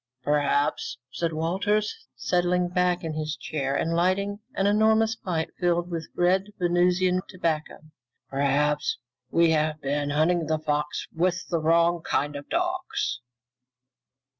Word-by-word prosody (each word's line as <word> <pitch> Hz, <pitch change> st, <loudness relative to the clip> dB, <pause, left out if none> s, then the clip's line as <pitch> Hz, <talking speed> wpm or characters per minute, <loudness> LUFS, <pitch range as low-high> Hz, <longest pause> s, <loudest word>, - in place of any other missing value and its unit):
"Perhaps," 145 Hz, 0 st, +1 dB
said 170 Hz, -1 st, -1 dB
Walters, 205 Hz, -, -1 dB
settling 180 Hz, 0 st, +1 dB
back 180 Hz, 0 st, +1 dB
in 160 Hz, -1 st, -3 dB
his 155 Hz, 0 st, -3 dB
chair 140 Hz, -3 st, -3 dB
and 165 Hz, -, 0 dB
lighting 195 Hz, +4 st, +1 dB, 0.2 s
an 195 Hz, -, +1 dB
enormous 220 Hz, +2 st, +3 dB
pipe 170 Hz, -7 st, -3 dB
filled 175 Hz, 0 st, +1 dB
with 165 Hz, -2 st, -4 dB
red 185 Hz, +2 st, +3 dB
Venusian 180 Hz, +1 st, +2 dB
tobacco, 165 Hz, -4 st, -2 dB, 0.5 s
"perhaps 145 Hz, +2 st, +1 dB, 0.3 s
we 170 Hz, +2 st, +4 dB
have 155 Hz, 0 st, +1 dB
been 145 Hz, 0 st, -1 dB
hunting 160 Hz, +3 st, +2 dB
the 155 Hz, -, +1 dB
fox 150 Hz, -1 st, -2 dB
with 180 Hz, +2 st, 0 dB
the 170 Hz, -, +1 dB
wrong 170 Hz, +1 st, +3 dB
kind 145 Hz, -2 st, -1 dB
of 145 Hz, 0 st, -8 dB
dogs." 125 Hz, -, -1 dB
170 Hz, 130 wpm, -26 LUFS, 150-180 Hz, 0.5 s, we